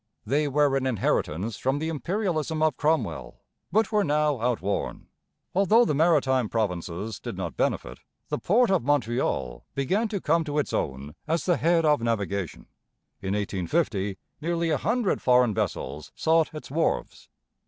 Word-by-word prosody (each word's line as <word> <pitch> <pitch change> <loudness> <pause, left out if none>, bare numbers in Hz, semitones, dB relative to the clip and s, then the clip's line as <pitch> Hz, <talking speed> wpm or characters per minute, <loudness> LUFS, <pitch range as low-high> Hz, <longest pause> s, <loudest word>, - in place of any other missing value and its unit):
They 145 +6 +1
were 145 0 +2
an 135 -1 0
inheritance 105 -3 -1
from 135 +2 0
the 160 +2 -2
imperialism 165 -2 -1
of 155 -4 +2
Cromwell, 85 - -1 0.3
but 220 +2 +2
were 210 -1 +3
now 150 - +1
outworn. 115 -5 -1 0.5
Although 210 +5 +5
the 150 - +1
Maritime 140 -6 +3
Provinces 100 -1 -2
did - - -6
not 85 -7 -4
benefit, - - -1 0.3
the - - -1
port 230 +3 +3
of 190 - +3
Montreal 120 - 0
began 190 - +1
to 205 -2 -3
come 165 0 +2
to 145 -1 -3
its 150 - 0
own, 70 +1 -3
as 165 +2 0
the 175 -2 +3
head 165 0 +3
of 150 -4 +3
navigation. 100 -6 -2 0.6
In 95 +1 -1
1850 100 - -1 0.2
nearly 170 0 0
a 150 - +2
hundred 230 - 0
foreign 125 -3 +4
vessels 75 -5 -3
sought 160 0 +2
its 155 -1 -9
wharves. 160 +3 -1
140 Hz, 155 wpm, -26 LUFS, 105-165 Hz, 0.6 s, Although